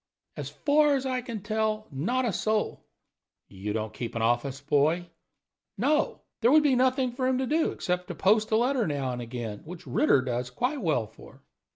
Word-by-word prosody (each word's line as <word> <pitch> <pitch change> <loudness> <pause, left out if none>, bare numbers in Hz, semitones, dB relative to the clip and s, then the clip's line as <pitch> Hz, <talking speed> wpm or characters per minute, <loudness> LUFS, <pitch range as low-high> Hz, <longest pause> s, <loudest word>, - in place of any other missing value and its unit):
"As - - -5
far 295 0 +3
as 270 -1 -2
I 255 -1 -1
can 230 -5 -6
tell, 215 0 -1
not 235 - 0
a 225 - 0
soul." 215 +3 -1 0.6
"You 100 +2 -5
don't 110 0 -3
keep 115 +1 -5
an 115 - -1
office 120 +4 0
boy?" 155 +5 +1 0.7
"No. 300 +1 +1 0.2
There 235 +2 +5
would 305 +1 +6
be 280 -3 +4
nothing 255 0 +2
for 255 +1 -1
him 260 -1 +2
to 260 - 0
do 315 +5 +1
except 180 0 -2
to - - -6
post 215 +2 +3
a 220 - +2
letter 245 -1 +1
now 140 -4 -1
and 125 0 -4
again, 115 -3 -5
which 175 +2 -10
Ritter 130 +1 +3
does 125 -1 -2
quite 250 - -2
well 155 - +1
for." 110 - -16
205 Hz, 195 wpm, -27 LUFS, -, 0.7 s, would